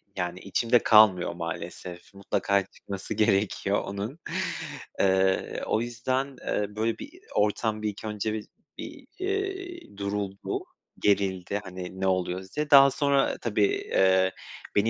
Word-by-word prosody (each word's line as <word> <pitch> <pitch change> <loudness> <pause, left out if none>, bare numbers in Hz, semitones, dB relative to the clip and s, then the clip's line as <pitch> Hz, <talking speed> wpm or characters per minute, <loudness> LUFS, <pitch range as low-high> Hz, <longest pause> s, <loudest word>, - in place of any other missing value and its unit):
yani, 90 -1 -3
içimde 115 +5 +2
kalmıyor 105 -5 +5
maalesef. 85 +2 -7
Mutlaka 100 0 0
çıkması 100 -1 -7
gerekiyor 100 -1 +2
onun. 100 +10 -5 0.8
Eee, 95 0 +2
o 110 - +1
yüzden, 130 +3 -2
eee, 105 0 -1
böyle 110 +1 0
bir - - -7
i - - -16 0.2
o - - +4
ortam 110 +1 0
bir 110 - 0
ilk 105 +2 -8
önce 105 0 -2
bir 110 -1 -4 0.3
bir, 300 -4 -9
iii, 380 - -4
duruldu, 100 -1 -3 0.4
gerildi, 100 -1 +1
hani 95 0 -7
"Ne 95 - +2
oluyoruz?" 95 +2 -1
diye. 150 0 0
Daha 140 -1 +9
sonra 140 0 +2
tabii, 105 -3 +1
eee, 95 -1 +3 0.4
beni 105 +2 +3
105 Hz, 135 wpm, -27 LUFS, 95-120 Hz, 0.8 s, Daha